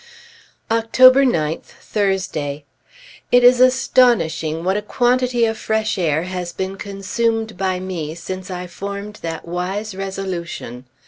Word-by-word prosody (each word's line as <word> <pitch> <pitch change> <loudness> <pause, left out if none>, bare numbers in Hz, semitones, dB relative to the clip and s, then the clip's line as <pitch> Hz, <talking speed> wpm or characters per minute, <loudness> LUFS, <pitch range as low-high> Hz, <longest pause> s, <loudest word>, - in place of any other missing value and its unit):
October 255 +4 +6
9th, 160 - 0
Thursday. 175 -8 -2 0.7
It 245 0 +5
is 245 0 +7
astonishing 235 -11 +3
what 190 +2 +1
a 210 - 0
quantity 245 +1 +1
of 225 -1 -2
fresh 220 0 0
air 160 -2 +1
has 180 -1 -4
been 190 +2 -4
consumed 220 +3 -2
by 185 -1 -1
me 170 -5 -5
since 185 +2 -7
I 180 -1 -5
formed 200 +3 -7
that 165 0 -5
wise 190 +5 -3
resolution. 185 -10 -5
195 Hz, 125 wpm, -20 LUFS, 170-225 Hz, 0.7 s, is